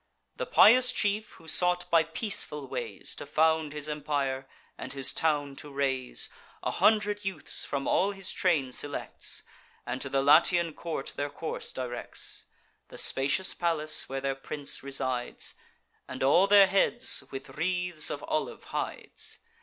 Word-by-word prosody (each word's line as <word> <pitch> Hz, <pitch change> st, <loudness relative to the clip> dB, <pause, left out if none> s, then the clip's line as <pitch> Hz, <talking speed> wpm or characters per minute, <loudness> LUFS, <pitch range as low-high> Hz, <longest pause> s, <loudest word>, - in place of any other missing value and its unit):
The -, -, -3 dB
pious 250 Hz, +3 st, +7 dB
chief, 210 Hz, -1 st, 0 dB
who 160 Hz, -, -16 dB
sought 180 Hz, +2 st, +1 dB
by 165 Hz, -, +6 dB
peaceful 160 Hz, -, -2 dB
ways 120 Hz, -6 st, -4 dB
To -, -, -7 dB
found 160 Hz, 0 st, +2 dB
his 150 Hz, 0 st, -3 dB
empire, 145 Hz, -3 st, -2 dB, 0.3 s
and -, -, -7 dB
his 135 Hz, -2 st, -2 dB
town 145 Hz, -3 st, 0 dB
to 145 Hz, -, -9 dB
raise, 135 Hz, -2 st, 0 dB, 0.4 s
A -, -, 0 dB
hundred 210 Hz, -1 st, +3 dB
youths 195 Hz, -1 st, -1 dB
from 140 Hz, -1 st, -3 dB
all 195 Hz, -, +3 dB
his 195 Hz, -2 st, -4 dB
train 155 Hz, -8 st, +1 dB
selects, 145 Hz, +3 st, -2 dB, 0.4 s
And 125 Hz, +2 st, -4 dB
to 135 Hz, -, -3 dB
the 135 Hz, 0 st, +1 dB
Latian 165 Hz, +3 st, +5 dB
court 160 Hz, -5 st, -5 dB
their 145 Hz, 0 st, -1 dB
course 160 Hz, +2 st, -5 dB
directs, 125 Hz, -1 st, -5 dB, 0.4 s
(The -, -, -12 dB
spacious 140 Hz, +8 st, +1 dB
palace 160 Hz, -3 st, 0 dB
where 135 Hz, 0 st, -3 dB
their 135 Hz, 0 st, 0 dB
prince 140 Hz, +1 st, -5 dB
resides,) 130 Hz, -2 st, -2 dB, 0.5 s
And 130 Hz, 0 st, -4 dB
all 175 Hz, +8 st, +5 dB
their 200 Hz, -1 st, +8 dB
heads 230 Hz, +5 st, +2 dB
with 135 Hz, -, -7 dB
wreaths 180 Hz, -1 st, 0 dB
of -, -, -4 dB
olive -, -, -2 dB
hides. -, -, -5 dB
150 Hz, 150 wpm, -29 LUFS, 135-180 Hz, 0.5 s, their